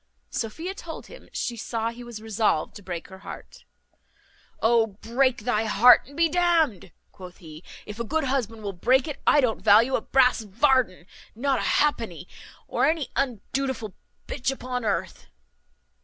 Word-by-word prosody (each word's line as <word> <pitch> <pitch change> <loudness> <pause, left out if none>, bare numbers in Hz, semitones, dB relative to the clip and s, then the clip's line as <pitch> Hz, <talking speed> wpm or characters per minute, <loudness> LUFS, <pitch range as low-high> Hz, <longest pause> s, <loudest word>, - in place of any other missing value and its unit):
Sophia 320 - -4
told 335 -4 -9
him, - - -14
she 240 - -3
saw 230 0 -3
he 240 +1 -10
was 235 -3 -9
resolved 215 -7 0
to 205 - -10
break 175 -3 -6
her 190 0 -12
heart. - - -11 0.9
"O 225 0 +3
break 235 +5 0
thy 225 -2 0
heart 230 +4 +6
and 285 - -14
be 335 0 +4
d 355 +3 -1
n'd," 320 - +2 0.2
quoth 180 -1 -12
he, 160 -2 -12 0.2
"if 210 +2 -9
a - - -1
good 315 +7 -1
husband 235 -5 -2
will 200 -1 -4
break 255 - +2
it. 295 -3 -6
I 295 - +6
don't 240 -4 0
value 225 +5 +5
a - - +1
brass 255 -1 +3
varden, 225 -3 +1 0.3
not 270 +3 0
a - - 0
halfpenny, 225 - -2 0.4
of - - -1
any 315 -3 +1
undutiful 255 -3 -2 0.3
b - - -6
upon 250 -2 -4
earth." 205 -3 -3
235 Hz, 165 wpm, -25 LUFS, 210-270 Hz, 0.9 s, heart